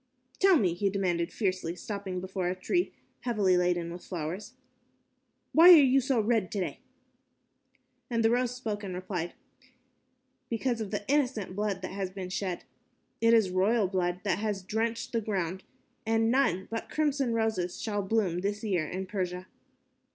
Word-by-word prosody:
"Tell 385 Hz, -3 st, +6 dB
me," 185 Hz, -, +2 dB
he 195 Hz, +3 st, 0 dB
demanded 180 Hz, -4 st, -1 dB
fiercely, 185 Hz, -5 st, -1 dB
stopping 195 Hz, -1 st, -5 dB
before 185 Hz, 0 st, -3 dB
a 180 Hz, -, -1 dB
tree 350 Hz, -, 0 dB, 0.3 s
heavily 210 Hz, -7 st, +2 dB
laden 175 Hz, -1 st, +1 dB
with 175 Hz, -, -9 dB
flowers, 180 Hz, +6 st, -5 dB, 1.0 s
"why 335 Hz, +3 st, +9 dB
are 360 Hz, -, +12 dB
you 270 Hz, -3 st, +5 dB
so 260 Hz, -1 st, +1 dB
red 220 Hz, -3 st, +1 dB
today?" 195 Hz, -3 st, -3 dB, 1.3 s
And 230 Hz, -2 st, +1 dB
the 225 Hz, -, +5 dB
roses 250 Hz, 0 st, +1 dB
spoke 220 Hz, -4 st, -4 dB
and 185 Hz, -2 st, -5 dB
replied, 180 Hz, -2 st, -4 dB, 1.2 s
"Because 235 Hz, 0 st, -1 dB
of 210 Hz, -, -4 dB
the 205 Hz, 0 st, -4 dB
innocent 255 Hz, -10 st, 0 dB
blood 200 Hz, -2 st, -2 dB
that -, -, -4 dB
has 190 Hz, -1 st, -3 dB
been 185 Hz, -1 st, -6 dB
shed. 185 Hz, -2 st, -3 dB, 0.6 s
It 230 Hz, 0 st, +6 dB
is 210 Hz, -5 st, +3 dB
royal 200 Hz, +3 st, +2 dB
blood 180 Hz, -1 st, -1 dB
that 195 Hz, -2 st, 0 dB
has 205 Hz, -3 st, -2 dB
drenched 230 Hz, +4 st, -2 dB
the 230 Hz, -, 0 dB
ground, 190 Hz, -3 st, -3 dB, 0.4 s
and 225 Hz, 0 st, +2 dB
none 190 Hz, -9 st, +2 dB
but 225 Hz, -, -4 dB
crimson 285 Hz, -5 st, 0 dB
roses 220 Hz, -6 st, -1 dB
shall 205 Hz, -2 st, -1 dB
bloom 195 Hz, -4 st, 0 dB
this 205 Hz, +2 st, -2 dB
year 180 Hz, -8 st, 0 dB
in 190 Hz, +3 st, -4 dB
Persia." 185 Hz, -2 st, -3 dB
200 Hz, 160 wpm, -29 LUFS, 185-230 Hz, 1.3 s, are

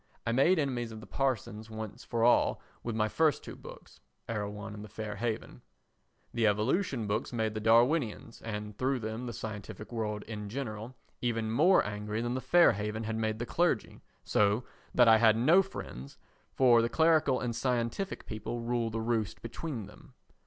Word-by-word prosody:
I 115 Hz, -, +1 dB
made 140 Hz, +10 st, +4 dB
enemies 125 Hz, -6 st, -1 dB
of 110 Hz, -, -8 dB
the 110 Hz, -, -11 dB
parsons 110 Hz, -5 st, -2 dB
once 110 Hz, -1 st, -7 dB
for 115 Hz, -1 st, -1 dB
all 120 Hz, -, +4 dB, 0.2 s
with 120 Hz, -2 st, -4 dB
my 110 Hz, -1 st, +2 dB
first 155 Hz, +6 st, +2 dB
two -, -, -8 dB
books. -, -, -13 dB, 0.3 s
[Erewhon 105 Hz, -1 st, -4 dB
and 105 Hz, 0 st, -8 dB
The 105 Hz, -, -10 dB
Fair 105 Hz, +1 st, -5 dB
Haven.] 115 Hz, -2 st, -3 dB, 0.7 s
The 115 Hz, -2 st, +2 dB
evolution 115 Hz, -, +1 dB
books 105 Hz, +2 st, -2 dB
made 110 Hz, -3 st, -1 dB
the 110 Hz, -, -3 dB
Darwinians, 115 Hz, +1 st, +2 dB
and 105 Hz, -1 st, -5 dB
through 130 Hz, +4 st, 0 dB
them 115 Hz, +1 st, -4 dB
the -, -, -3 dB
scientific 110 Hz, -1 st, -7 dB
world 105 Hz, -3 st, -3 dB
in 105 Hz, -2 st, -6 dB
general, 115 Hz, -1 st, -5 dB, 0.3 s
even 115 Hz, -2 st, -1 dB
more 170 Hz, +11 st, +5 dB
angry 105 Hz, +1 st, -3 dB
than 120 Hz, +1 st, -1 dB
The 130 Hz, -, -2 dB
Fair 175 Hz, +4 st, +6 dB
Haven 105 Hz, +1 st, -3 dB
had 110 Hz, 0 st, -3 dB
made 110 Hz, -1 st, -1 dB
the 120 Hz, -, -3 dB
clergy 170 Hz, -5 st, 0 dB, 0.2 s
so 105 Hz, +3 st, +2 dB, 0.3 s
that 120 Hz, -1 st, +5 dB
I 110 Hz, -1 st, +7 dB
had 110 Hz, -1 st, +5 dB
no 160 Hz, +11 st, +6 dB
friends, 70 Hz, -, -8 dB, 0.3 s
for 120 Hz, -3 st, +5 dB
the 115 Hz, -, 0 dB
clerical 160 Hz, -4 st, +3 dB
and 120 Hz, -2 st, -2 dB
scientific 125 Hz, -, -1 dB
people 110 Hz, +2 st, -5 dB
rule 120 Hz, -1 st, -1 dB
the 115 Hz, 0 st, -3 dB
roast 110 Hz, -2 st, -1 dB
between 115 Hz, -1 st, -5 dB
them. 130 Hz, +6 st, -16 dB
115 Hz, 180 wpm, -31 LUFS, 110-125 Hz, 0.7 s, I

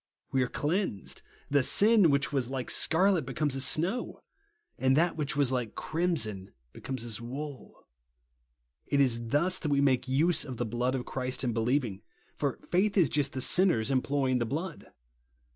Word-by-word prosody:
We 135 Hz, -, +1 dB
are 125 Hz, -, +1 dB
cleansed! 150 Hz, -, -2 dB, 0.3 s
The 140 Hz, -1 st, +4 dB
sin 205 Hz, -, +5 dB
which 140 Hz, +1 st, +1 dB
was 130 Hz, -3 st, -1 dB
like 130 Hz, -2 st, -3 dB
scarlet 185 Hz, +1 st, +3 dB
becomes 135 Hz, +2 st, -2 dB
as 135 Hz, 0 st, 0 dB
snow; 190 Hz, +11 st, -1 dB, 0.6 s
and 130 Hz, +1 st, +3 dB
that 170 Hz, +2 st, +2 dB
which 150 Hz, -4 st, -3 dB
was 140 Hz, -3 st, +2 dB
like 125 Hz, -4 st, -2 dB
crimson 115 Hz, -, -2 dB, 0.2 s
becomes 130 Hz, -3 st, -6 dB
as 115 Hz, -1 st, -4 dB
wool. 135 Hz, +3 st, -8 dB, 1.0 s
It 140 Hz, -, +1 dB
is 120 Hz, -4 st, +1 dB
thus 170 Hz, +9 st, +1 dB
that 155 Hz, -, -3 dB
we 140 Hz, -1 st, +2 dB
make 130 Hz, -3 st, +2 dB
use 155 Hz, +5 st, +2 dB
of 130 Hz, -4 st, -7 dB
the 120 Hz, -, -2 dB
blood 120 Hz, +3 st, -1 dB
of 125 Hz, -, -4 dB
Christ 130 Hz, 0 st, -3 dB
in 120 Hz, -2 st, 0 dB
believing; 115 Hz, -3 st, -1 dB, 0.3 s
for -, -, -2 dB
faith 200 Hz, +4 st, +2 dB
is 175 Hz, -7 st, +4 dB
just 145 Hz, -2 st, 0 dB
the 130 Hz, -, -3 dB
6innej:'s 150 Hz, -, +3 dB
employing 130 Hz, -1 st, +1 dB
the 120 Hz, -, 0 dB
blood. 165 Hz, +6 st, -5 dB
135 Hz, 170 wpm, -29 LUFS, 125-160 Hz, 1.0 s, sin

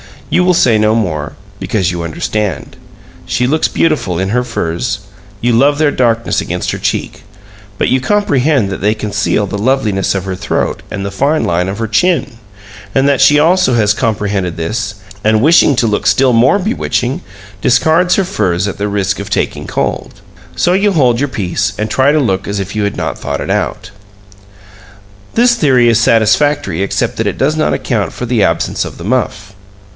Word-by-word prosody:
You 180 Hz, -, +3 dB
will 180 Hz, -1 st, +3 dB
say 115 Hz, -9 st, +3 dB
no 110 Hz, +1 st, +2 dB
more, 80 Hz, -10 st, -2 dB, 0.3 s
because 95 Hz, -5 st, -1 dB
you 85 Hz, -1 st, -4 dB
understand. 85 Hz, 0 st, -3 dB, 0.5 s
She 125 Hz, -, 0 dB
looks 155 Hz, +5 st, +1 dB
beautiful 125 Hz, -, 0 dB
in 95 Hz, +2 st, -1 dB
her 125 Hz, +4 st, +1 dB
furs; 95 Hz, -1 st, -2 dB, 0.4 s
you 120 Hz, -, +1 dB
love 140 Hz, +5 st, +3 dB
their 150 Hz, -1 st, +2 dB
darkness 115 Hz, -3 st, 0 dB
against -, -, -3 dB
her -, -, -4 dB
cheek; -, -, -3 dB, 0.5 s
but -, -, 0 dB
you 130 Hz, -, +2 dB
comprehend 140 Hz, -, +1 dB
that 95 Hz, -, -4 dB
they 105 Hz, +2 st, +1 dB
conceal 105 Hz, 0 st, -1 dB
the 100 Hz, -, -4 dB
loveliness 110 Hz, -5 st, 0 dB
of 95 Hz, -, -2 dB
her 95 Hz, -1 st, -4 dB
throat -, -, -2 dB
and 100 Hz, -1 st, -5 dB
the 100 Hz, -, -4 dB
fine 140 Hz, +10 st, 0 dB
line 90 Hz, +2 st, 0 dB
of 100 Hz, +3 st, -4 dB
her 115 Hz, -, -1 dB
chin, 135 Hz, -, 0 dB, 0.6 s
and 135 Hz, +1 st, +3 dB
that 140 Hz, -3 st, +2 dB
she 145 Hz, +2 st, +6 dB
also 170 Hz, -3 st, +3 dB
has 105 Hz, -2 st, +3 dB
comprehended 100 Hz, -6 st, -1 dB
this, 100 Hz, +5 st, -3 dB, 0.3 s
and, 110 Hz, 0 st, +3 dB
wishing 150 Hz, 0 st, +5 dB
to 120 Hz, -, +1 dB
look 105 Hz, -2 st, 0 dB
still 130 Hz, -2 st, +3 dB
more 120 Hz, +10 st, +4 dB
bewitching, 180 Hz, -, -2 dB, 0.4 s
discards 160 Hz, +8 st, +3 dB
her 195 Hz, -, +2 dB
furs 100 Hz, -, -1 dB
at -, -, -7 dB
the 105 Hz, -, -1 dB
risk 100 Hz, -1 st, -1 dB
of 100 Hz, +1 st, -6 dB
taking 105 Hz, -, -2 dB
cold. -, -, -3 dB, 0.3 s
So 175 Hz, -, +2 dB
you 200 Hz, +2 st, +2 dB
hold 125 Hz, -7 st, +2 dB
your 145 Hz, 0 st, 0 dB
peace, 95 Hz, -3 st, -2 dB
and 105 Hz, 0 st, -3 dB
try 130 Hz, +5 st, +3 dB
to 155 Hz, -, +3 dB
look 95 Hz, -8 st, -1 dB
as 100 Hz, 0 st, -2 dB
if 95 Hz, +1 st, -5 dB
you 105 Hz, -1 st, 0 dB
had 100 Hz, -, -2 dB
not -, -, -3 dB
thought 70 Hz, -1 st, -4 dB
it -, -, -3 dB
out. -, -, -2 dB, 1.4 s
This 240 Hz, +1 st, +4 dB
theory 130 Hz, -, +3 dB
is 115 Hz, -1 st, +3 dB
satisfactory 115 Hz, -, +2 dB
except 100 Hz, -, -1 dB
that -, -, -1 dB
it -, -, -2 dB
does 150 Hz, +4 st, +1 dB
not 155 Hz, -, +1 dB
account 110 Hz, -6 st, -2 dB
for 125 Hz, -, -5 dB
the 120 Hz, -2 st, 0 dB
absence 85 Hz, -4 st, 0 dB
of -, -, -9 dB
the 85 Hz, -, -9 dB
muff. 105 Hz, -3 st, -2 dB
115 Hz, 190 wpm, -14 LUFS, 100-140 Hz, 1.4 s, she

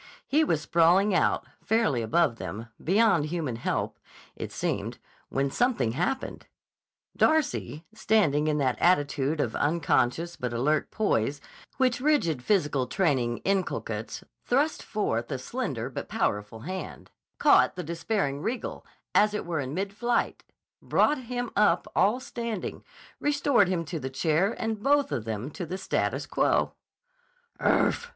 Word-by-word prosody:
He 305 Hz, +3 st, +3 dB
was 160 Hz, -, +1 dB
sprawling 175 Hz, +6 st, +4 dB
out, 180 Hz, -, +2 dB, 0.2 s
fairly 215 Hz, -, +2 dB
above 115 Hz, +2 st, +2 dB
them, 115 Hz, +2 st, -6 dB
beyond 195 Hz, -3 st, +3 dB
human 150 Hz, -8 st, -3 dB
help, 120 Hz, -, -2 dB, 0.4 s
it -, -, -6 dB
seemed, -, -, -2 dB, 0.3 s
when 135 Hz, 0 st, 0 dB
something 235 Hz, -, +1 dB
happened. 180 Hz, -, -3 dB, 0.7 s
Darcy, 175 Hz, -, +1 dB
standing 195 Hz, -9 st, +2 dB
in 150 Hz, -1 st, +1 dB
that 130 Hz, -4 st, 0 dB
attitude 145 Hz, -3 st, +2 dB
of 120 Hz, -6 st, -1 dB
unconscious 165 Hz, +1 st, +1 dB
but 125 Hz, -1 st, -3 dB
alert 145 Hz, +6 st, +1 dB
poise 145 Hz, -, 0 dB, 0.4 s
which 255 Hz, -2 st, +2 dB
rigid 265 Hz, -, +2 dB
physical 145 Hz, -7 st, +1 dB
training 130 Hz, -, 0 dB
inculcates, 195 Hz, -1 st, -2 dB, 0.2 s
thrust 285 Hz, +5 st, +1 dB
forth 120 Hz, -, -2 dB
a 135 Hz, -, -1 dB
slender 130 Hz, -, -3 dB
but 130 Hz, -, -6 dB
powerful 105 Hz, +2 st, -2 dB
hand, 185 Hz, +8 st, -7 dB, 0.3 s
caught -, -, +5 dB
the 180 Hz, -, -4 dB
despairing 165 Hz, -3 st, -2 dB
Riegel, 235 Hz, +8 st, -4 dB, 0.3 s
as 210 Hz, 0 st, +4 dB
it -, -, -3 dB
were 170 Hz, -2 st, -2 dB
in 135 Hz, +1 st, -4 dB
mid 195 Hz, +2 st, -2 dB
flight, 240 Hz, +3 st, -1 dB, 0.4 s
brought 300 Hz, -1 st, +2 dB
him 245 Hz, 0 st, -3 dB
up 210 Hz, -, +3 dB
all 210 Hz, +6 st, +3 dB
standing, 235 Hz, -5 st, -5 dB, 0.4 s
restored 285 Hz, -7 st, +3 dB
him 175 Hz, -2 st, -1 dB
to 165 Hz, +1 st, -4 dB
the 130 Hz, -1 st, -4 dB
chair 160 Hz, -, +1 dB
and 220 Hz, -2 st, -2 dB
both 285 Hz, +2 st, +2 dB
of 110 Hz, -, -2 dB
them 110 Hz, +5 st, -4 dB
to 180 Hz, -, -6 dB
the 185 Hz, -, -4 dB
status 190 Hz, -, -1 dB
quo. -, -, +1 dB, 0.9 s
"Urf!" 485 Hz, -, +2 dB
170 Hz, 140 wpm, -27 LUFS, 135-220 Hz, 0.9 s, caught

